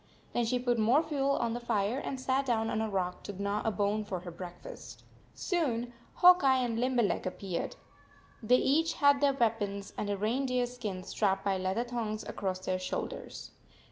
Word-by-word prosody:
.Then 240 - +1
she 250 +2 +1
put 245 -1 0
more 245 +9 +4
fuel 280 -3 0
on 230 -1 0
the 240 - -3
fire 225 +1 0
and 270 -2 -4
sat 260 +1 +1
down 225 -2 +1
on 220 - 0
a 220 - -1
rock 180 -2 -2
to 200 -2 -8
gnaw 200 +1 -1
a 225 - +1
bone 210 0 0
for 185 -4 -4
her 175 -1 -7
breakfast. 175 0 -10 0.3
Soon 245 - -1 0.2
Hawk 360 0 +7
Eye 265 -1 +5
and 230 -1 -2
Limberleg 245 -6 +1
ap 185 - -5
peared. 185 -4 -3 0.7
They 245 +2 +4
each 320 +6 +2
had 285 -1 +4
their 280 -1 +4
weapons, 205 -5 -1
and 205 - -2
a 200 - 0
reindeer 250 +4 0
skin 220 -7 -5
strapped 195 0 0
by 195 -1 +1
leather 190 +5 0
thongs 230 -3 -3
across 190 -2 -3
their 185 0 -1
shoulders. 185 - -5
225 Hz, 190 wpm, -31 LUFS, 200-255 Hz, 0.7 s, Hawk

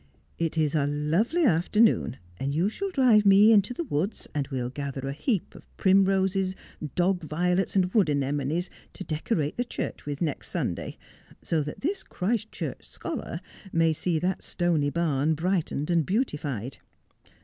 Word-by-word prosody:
'It 165 -1 -1
is 155 -2 +2
a 145 -3 +2
lovely 165 - +1
afternoon, 210 - +3 0.2
and 140 +2 -2
you 175 +6 +2
shall 395 - -3
drive 255 - +5
me 200 +2 +7
into 210 +1 +4
the 245 - -3
woods, 195 - -2
and 145 -2 -1
we'll 125 -3 -3
gather 135 -1 -4
a - - -2
heap 200 - -1
of - - -14
primroses, 190 0 +3 0.4
dog 180 +1 +2
violets, 180 +5 0
and 185 -1 +2
wood 205 -8 +4
anemones, 145 +4 0 0.3
to 190 - -7
decorate 155 -1 -2
the 245 - +1
church 245 - -5
with 145 -1 -3
next 155 -5 -2
Sunday, - - -3 0.5
so 160 -2 +1
that 150 0 -6
tin; 335 +8 +1
) - - -38
Christchurch 220 +3 -3
scholar - - -6 0.3
may 165 -1 +3
see 165 +2 -1
that 180 +4 -1
stony 165 -5 0
barn 155 -1 +1
brightened 170 -2 -1
and 170 -2 +3
beautified. 145 - -2
170 Hz, 160 wpm, -27 LUFS, 150-195 Hz, 0.5 s, me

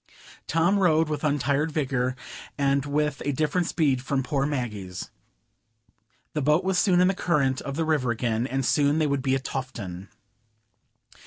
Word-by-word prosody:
Tom 170 +5 +2
rowed 160 -4 +3
with 150 -1 -3
untired 145 +1 +1
vigor, 130 -4 -1 0.4
and 140 0 +1
with 150 0 -1
a 145 - 0
different 155 +5 0
speed 140 -6 +1
from 135 0 -1
poor 135 +2 0
Maggie's. 105 -10 -4 1.2
The 150 - -1
boat 150 +6 +3
was 190 -1 +1
soon 180 -3 +3
in 180 - +5
the 190 - +2
current 140 -8 0
of 140 - -5
the 165 +1 0
river 150 -6 +1
again, 120 0 -1
and 135 -1 -2
soon 145 +2 +2
they 155 - +2
would 140 -2 0
be 135 0 +1
at 135 - -3
Tofton. 105 -10 -5
140 Hz, 165 wpm, -26 LUFS, 130-155 Hz, 1.2 s, in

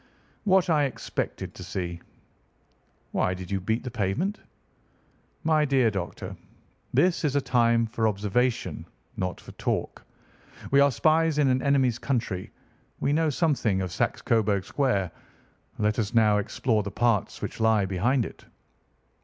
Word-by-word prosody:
"What 190 -2 +4
I 150 -4 +3
expected 135 - -4
to - - -9
see." 85 -2 -4 1.1
"Why 90 - 0
did 90 0 -8
you 100 - 0
beat 110 +5 -1
the 125 - -5
pavement?" 120 - -1 1.0
"My 155 -1 +3
dear 135 -5 +3
doctor, 95 -4 -5 0.6
this 180 -1 +2
is 145 -2 0
a - - +4
time 120 -3 +2
for 115 0 0
observation, 110 +4 0 0.3
not 90 -1 -3
for - - -12
talk. - - -3 0.7
We 140 - +5
are 140 0 +6
spies 155 +5 +2
in 145 -3 +4
an 130 0 +2
enemy's 130 -4 +2
country. 115 -9 -2 0.5
We 140 - +1
know 160 +1 +2
something 135 - +1
of 95 -2 -3
Saxe - - -1
Coburg 105 -4 +1
Square. 100 - 0 0.7
Let 105 +2 +1
us 110 +1 -2
now 105 -2 +5
explore 110 +2 0
the 100 - -4
parts 110 -1 0
which - - -5
lie 110 -3 +3
behind 105 +7 +1
it." - - -10
115 Hz, 145 wpm, -26 LUFS, 100-140 Hz, 1.1 s, are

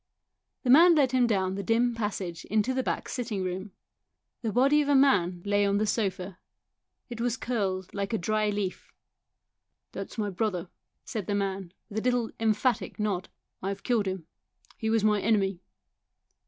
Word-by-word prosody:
The 250 - +3
man 335 +5 +8
led 275 -5 +3
him 255 -2 +3
down 190 -4 +1
the 200 - -3
dim 230 +4 +2
passage 195 -6 -4
into 215 +4 +1
the 260 - +1
back - - -2
sitting 225 -6 -3
room. 185 +2 -4 0.7
The 225 -3 -1
body 275 +6 +4
of 290 - -1
a 285 - +5
man 185 -11 +3
lay 205 0 +2
on 200 0 +2
the 215 - +1
sofa; 195 -4 -2 0.7
it 235 -2 -6
was 245 0 0
curled 195 -7 -2
like 200 -1 -3
a 225 - +1
dry 215 +3 0
leaf. 205 -2 -3 0.5
" - - -56
That - - -5
is - - -13
my 205 -2 -1
brother," 185 -3 -2 0.4
said 210 -5 -4
the 205 - 0
man, 195 -3 -2 0.2
with 220 -1 -3
a - - -4
little 245 -1 +1
emphatic 225 +2 0
nod; 200 -4 -1 0.2
" - - -55
I 195 - -2
have 200 0 -5
killed 230 -5 +1
him. 185 -3 -4 0.5
He 220 - -2
was 225 -1 +2
my 210 -1 +3
enemy." 195 -4 +1
210 Hz, 185 wpm, -28 LUFS, 195-235 Hz, 0.7 s, man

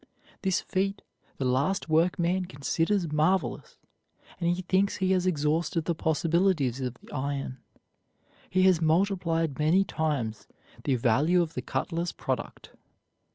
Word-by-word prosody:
This 190 -2 +1
feat 195 0 -2 0.3
the 135 - -2
last 140 +10 +1
workman 175 +3 +2
considers 170 +2 -1
marvelous, 160 +5 0 0.6
and 170 -1 +1
he 175 +2 -1
thinks 190 +2 +1
he 190 0 0
has 185 -1 +2
exhausted 160 +1 0
the 170 - +1
possibilities 160 -4 +1
of 125 -1 -3
the - - -17
iron. 135 -1 -3 0.9
He 185 0 +2
has 185 -3 +4
multiplied 165 -3 +1
many 165 +6 +4
times 145 - -2 0.4
the 135 - +2
value 145 +10 +3
of 165 - -7
the - - -3
cutler's 170 0 -2
product. - - -4
165 Hz, 130 wpm, -28 LUFS, 145-185 Hz, 0.9 s, has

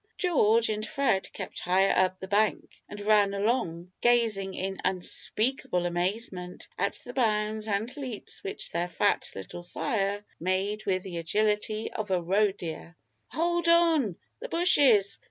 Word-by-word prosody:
George 230 - +3
and 215 0 -2
Fred 250 -7 0
kept - - -6
higher 190 +2 +2
up 185 0 +2
the 190 - -7
bank, 210 +2 +1 0.2
and 205 - -8
ran 205 -1 +3
along, 195 -5 -1
gazing 225 -5 +2
in 190 +1 -4
unspeakable 190 +3 0
amazement 180 +1 -3
at - - -1
the 245 - -8
bounds 215 -3 0
and 220 +5 -2
leaps 260 -7 -6
which 195 - -5
their 170 +1 -1
fat 175 - 0
little 95 - -8
sire 200 +2 -2
made 195 +5 -2
with 185 -1 0
the 180 -3 -6
agility 210 +5 -1
of 215 -1 -4
a 185 -1 +2
roe 195 +4 +2
deer. 170 -2 -8 0.3
"Hold 345 +1 -1
on! 330 - +4 0.2
the - - -7
bushes! 280 - +5
205 Hz, 145 wpm, -28 LUFS, 185-230 Hz, 0.3 s, bushes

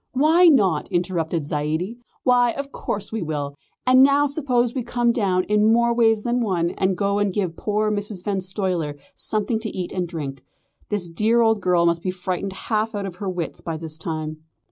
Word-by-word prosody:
"Why 315 +7 +5
not?" 195 - +3
interrupted 170 -3 -1
Zaidie, 155 +10 -2 0.2
"why, 245 -2 +4
of 280 0 -5
course 205 -1 -4
we 220 -1 -3
will. 145 -3 -3 0.3
And 255 +1 +6
now 280 +2 +5
suppose 255 -5 0
we 260 - -2
come 240 0 +1
down 195 -6 +1
in 210 +2 +3
more 235 +1 +3
ways 225 -2 +3
than 240 +1 0
one 175 -6 0
and 190 -1 0
go 200 +1 +1
and 205 -1 +1
give 180 -4 -2
poor 215 +2 0
Mrs. 205 -3 -2
Van 195 -1 -1
Stuyler 180 -6 -2 0.2
something 220 +1 -1
to 220 0 -4
eat 180 -3 -5
and 180 -2 -2
drink. 145 -6 -6 0.5
The 205 -4 0
dear 225 +6 +3
old 225 -2 +3
girl 180 -2 +3
must 170 0 +2
be 185 - -2
frightened 185 +1 -3
half 215 +2 -2
out 200 -1 -3
of 180 -2 -7
her 195 0 -3
wits 180 -3 -4
by 165 -1 -4
this 160 -1 -6
time." 155 -1 -4
200 Hz, 195 wpm, -23 LUFS, 175-230 Hz, 0.5 s, And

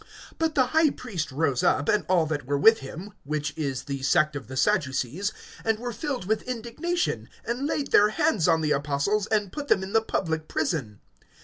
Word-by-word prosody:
(17)But 320 -1 0
the 260 - +4
high 315 +4 +3
priest 180 - -5
rose 135 -2 0
up, 145 - +2
and 210 - +2
all 175 -3 +4
that 145 -4 -3
were 145 0 +1
with 225 +10 +6
him, 175 +9 -8
which 150 +1 -2
is 140 -5 -3
the 140 -2 -5
sect 145 +2 +2
of 130 -6 -6
the 130 +1 -7
Sadducees, 170 - 0 0.3
and 225 -1 +1
were 240 +1 -5
filled 265 - -3
with 220 +3 0
indignation, 255 +9 -2 0.2
(18)and 255 +5 -1
laid 285 -3 -2
their 210 +1 +6
hands 210 -4 +1
on 160 - +3
the 150 -1 0
apostles, 145 +8 0
and 205 -3 0
put 290 -1 -5
them 190 - +3
in 190 - -7
the 225 - +5
public 160 -7 -2
prison. 115 - -2
185 Hz, 200 wpm, -26 LUFS, 145-225 Hz, 0.3 s, with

